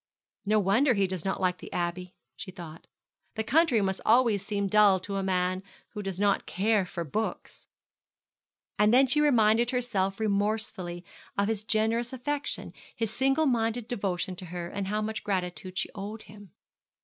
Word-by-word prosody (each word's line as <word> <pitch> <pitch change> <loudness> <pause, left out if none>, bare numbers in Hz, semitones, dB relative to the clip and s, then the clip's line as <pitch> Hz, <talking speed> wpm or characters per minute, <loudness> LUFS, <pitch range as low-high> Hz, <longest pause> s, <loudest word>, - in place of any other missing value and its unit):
'No 215 +1 +4
wonder 225 +7 +3
he 200 -1 +2
does 185 -3 -3
not 195 - -2
like 180 -1 0
the - - -10
Abbey,' 175 +1 -3 0.2
she 195 - -8
thought. 170 -4 -10 0.5
'The 220 - -1
country 285 -2 +3
must 190 0 -1
always 225 -4 +4
seem 200 -1 -1
dull 205 -1 +5
to 195 +2 -5
a - - 0
man 185 -1 0 0.3
who 210 - -6
does 195 -2 -5
not 205 -1 +1
care 205 0 +1
for 170 -1 -4
books.' 215 +9 -4 1.1
And 210 0 +5
then 260 +3 +6
she 300 +3 +2
reminded 235 -4 +4
herself 225 -7 -1
remorsefully 200 -4 -1 0.3
of 200 0 +2
his 215 -2 -2
generous 225 +3 0
affection, 285 +3 -3 0.2
his 225 -2 -2
single 270 +4 +2
minded 230 -3 0
devotion 190 -5 -2
to 185 - -8
her, 175 0 -5
and 200 0 -4
how 210 +2 -1
much 220 0 -4
gratitude 185 -1 -3
she - - -1
owed 210 +2 -7
him. 205 -1 -14
205 Hz, 170 wpm, -28 LUFS, 185-225 Hz, 1.1 s, then